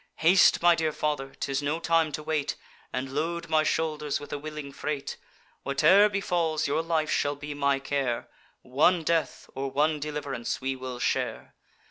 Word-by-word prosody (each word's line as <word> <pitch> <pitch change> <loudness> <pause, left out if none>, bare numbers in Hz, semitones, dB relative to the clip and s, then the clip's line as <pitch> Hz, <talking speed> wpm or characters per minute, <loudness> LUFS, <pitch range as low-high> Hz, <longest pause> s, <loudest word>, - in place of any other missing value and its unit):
'Haste, 175 +1 +5
my 175 0 +7
dear 160 -2 0
father, 145 -3 -2
('tis 135 +1 -1
no 145 +3 -1
time 165 -2 +2
to 155 - -4
wait,) 155 -2 -1 0.4
And 130 +1 -4
load 165 +3 -2
my 155 -1 +4
shoulders 155 -2 -1
with 145 - -9
a 145 - -3
willing 150 -1 -7
freight. 145 -1 -4 0.4
Whate'er 155 +10 +5
befalls, 175 -6 0
your 145 +3 +1
life 160 -2 0
shall 145 0 +1
be 145 +1 -7
my 140 -1 +1
care; 135 -3 -2 0.4
One 160 +7 +3
death, 165 0 -1
or 135 +1 -3
one 150 +3 +1
deliv'rance, 145 -5 -4
we 135 0 -2
will 130 -1 -6
share. - - -2
150 Hz, 165 wpm, -27 LUFS, 140-160 Hz, 0.4 s, my